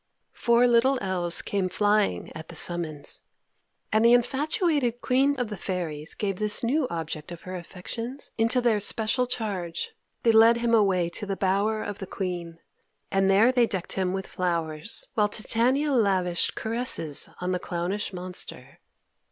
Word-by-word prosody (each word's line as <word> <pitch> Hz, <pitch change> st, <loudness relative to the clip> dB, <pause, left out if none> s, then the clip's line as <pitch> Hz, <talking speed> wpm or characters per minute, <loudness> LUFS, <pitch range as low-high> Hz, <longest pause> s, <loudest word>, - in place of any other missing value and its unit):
Four 235 Hz, 0 st, +3 dB
little 245 Hz, +3 st, +4 dB
elves 180 Hz, -4 st, 0 dB
came 195 Hz, -2 st, -1 dB
flying 205 Hz, -, +1 dB
at 160 Hz, 0 st, -9 dB
the 170 Hz, -, -10 dB
summons, 160 Hz, -4 st, 0 dB, 0.7 s
and 220 Hz, +1 st, +3 dB
the 235 Hz, +1 st, +6 dB
infatuated 275 Hz, -, +1 dB
Queen 270 Hz, +3 st, +2 dB
of 245 Hz, -3 st, -2 dB
the 210 Hz, -, -4 dB
Fairies 170 Hz, -5 st, -4 dB
gave 195 Hz, -3 st, -2 dB
this 210 Hz, +2 st, +1 dB
new 265 Hz, +4 st, +1 dB
object 160 Hz, -1 st, -5 dB
of 175 Hz, -, -8 dB
her 185 Hz, 0 st, -7 dB
affections 230 Hz, +9 st, -6 dB
into 230 Hz, +3 st, +2 dB
their 230 Hz, -3 st, +2 dB
special 230 Hz, +4 st, +1 dB
charge. 205 Hz, -, -3 dB, 0.3 s
They 230 Hz, -, +5 dB
led 225 Hz, +1 st, +6 dB
him 235 Hz, 0 st, 0 dB
away 190 Hz, -6 st, +3 dB
to 205 Hz, +4 st, -3 dB
the 195 Hz, -1 st, -2 dB
bower 200 Hz, +3 st, 0 dB
of 205 Hz, -1 st, -6 dB
the 190 Hz, -, -6 dB
Queen, 175 Hz, -4 st, -5 dB, 0.5 s
and 195 Hz, 0 st, +2 dB
there 210 Hz, +6 st, +5 dB
they 245 Hz, -2 st, +3 dB
decked 190 Hz, -5 st, -4 dB
him 185 Hz, -1 st, -1 dB
with 190 Hz, 0 st, -3 dB
flowers, 165 Hz, 0 st, -2 dB
while 210 Hz, -1 st, +2 dB
Titania 250 Hz, +8 st, +1 dB
lavished 190 Hz, -8 st, +2 dB
caresses 220 Hz, -, 0 dB
on 180 Hz, 0 st, -2 dB
the 180 Hz, -, -1 dB
clownish 180 Hz, +5 st, -3 dB
monster. 180 Hz, -1 st, -7 dB
205 Hz, 160 wpm, -26 LUFS, 180-235 Hz, 0.7 s, the